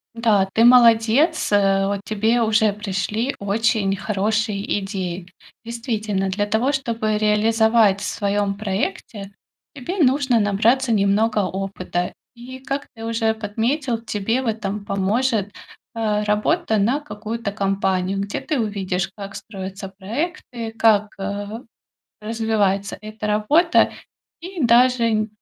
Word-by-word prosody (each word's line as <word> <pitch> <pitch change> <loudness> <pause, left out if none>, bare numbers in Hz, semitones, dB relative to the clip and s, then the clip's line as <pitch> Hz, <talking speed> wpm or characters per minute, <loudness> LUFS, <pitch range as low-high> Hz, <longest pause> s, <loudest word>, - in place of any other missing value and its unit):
Да, 215 -5 +2
ты 230 - +4
молодец, 240 +6 +5
а. 195 -1 +3
Вот 200 0 -2
тебе 220 +3 +1
уже 215 -2 +3
пришли 210 +5 -2
очень 200 -1 +1
хорошие 210 +1 -1
идеи. 185 -2 -5 0.4
Действительно, 220 -4 -2
для 205 +2 -1
того, 225 +6 +1
чтобы 230 -6 -1
реализовать 215 -1 +3
в - - -5
своём 200 -1 -1
проекте, 200 0 -4 0.4
тебе 285 +9 -5
нужно 265 -3 +3
набраться 225 +5 +2
немного 210 +1 +2
опыта. 185 -2 -3 0.2
И, 255 +2 -10
как 275 +2 -4
ты 225 0 -8
уже 225 -1 0
подметил, 225 +4 -2
тебе 225 +2 -1
в 260 - -4
этом 210 -2 -3
поможет, 205 +2 0 0.4
а, 215 -2 0
работа 220 +6 +1
на 235 +8 +2
какую-то 215 -2 -5
компанию, 195 -2 -1
где 200 +1 -3
ты 300 -4 -2
увидишь, 190 -4 -2
как 200 -1 -8
строятся 195 -1 -7
проекты, 235 - -4
как, 215 -2 +2
а, 205 +3 -5 0.6
развивается 210 -3 -1
эта 215 0 -6
работа. 285 +12 +3 0.5
И 355 -2 -5
даже 235 -2 +3
215 Hz, 120 wpm, -21 LUFS, 200-230 Hz, 0.6 s, молодец